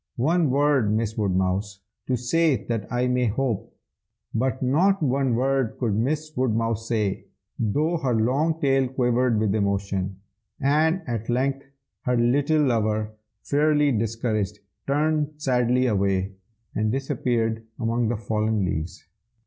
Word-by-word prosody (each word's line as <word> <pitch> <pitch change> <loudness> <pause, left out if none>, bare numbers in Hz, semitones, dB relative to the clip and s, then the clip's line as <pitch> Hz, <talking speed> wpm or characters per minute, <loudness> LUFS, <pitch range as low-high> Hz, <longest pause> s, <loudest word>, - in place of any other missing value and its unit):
One 160 +4 +2
word, 140 -5 +2
Miss 110 0 -1
Woodmouse, 95 0 -1 0.3
to 130 - +1
say 135 0 +1
that 115 -3 -3
I 125 0 +1
may 125 -1 +1
hope!' 115 0 -2 0.6
But 130 +3 -1
not 170 +8 +2
one 135 -2 +1
word 130 -1 0
could 115 -5 0
Miss 150 +8 -1
Woodmouse 115 -2 0
say, 105 -5 -1 0.3
though 150 +10 +1
her 130 -6 0
long 140 +9 +1
tail 135 -2 +2
quivered 125 -2 +1
with 105 -2 +1
emotion; 100 -2 -1 0.4
and 155 +5 +2
at 115 -2 -4
length 135 +3 0 0.4
her 125 -1 +2
little 145 +6 +2
lover, 110 -4 0 0.3
fairly 150 0 +2
discouraged, 110 -3 -1 0.3
turned 150 +1 +1
sadly 125 -3 +1
away, 100 -3 0 0.4
and 110 0 0
disappeared 115 -4 -1 0.2
among 115 0 0
the 115 0 -1
fallen 110 -1 0
leaves. 80 -1 -4
120 Hz, 130 wpm, -24 LUFS, 110-140 Hz, 0.6 s, One